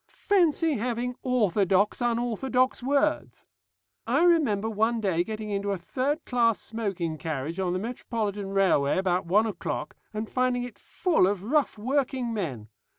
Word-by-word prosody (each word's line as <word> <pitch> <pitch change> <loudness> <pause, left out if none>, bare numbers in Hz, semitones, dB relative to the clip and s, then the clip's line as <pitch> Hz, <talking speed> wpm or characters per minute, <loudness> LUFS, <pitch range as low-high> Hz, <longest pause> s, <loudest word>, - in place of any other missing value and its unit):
Fancy 330 -6 +3
having 240 +2 -2
orthodox 205 -4 +2
unorthodox 245 +2 0
words! 280 +3 0 0.6
I - - +3
remember 285 - +3
one 225 +2 +1
day 185 -5 +1
getting 215 +1 -5
into 200 0 -1
a 200 - 0
third 270 - -2
class 230 -3 +2
smoking 190 -8 -4
carriage 155 +3 -4
on 180 -2 0
the - - 0
Metropolitan 210 -2 -3
Railway 190 -8 +2
about 185 -2 0
one 210 +6 +4
o'clock, 170 -7 -4 0.2
and 215 +1 -4
finding 255 0 0
it 245 - -9
full 330 - +1
of 195 -1 -1
rough 275 +2 +1
working 255 0 -1
men. 135 - -4
220 Hz, 145 wpm, -27 LUFS, 195-250 Hz, 0.6 s, one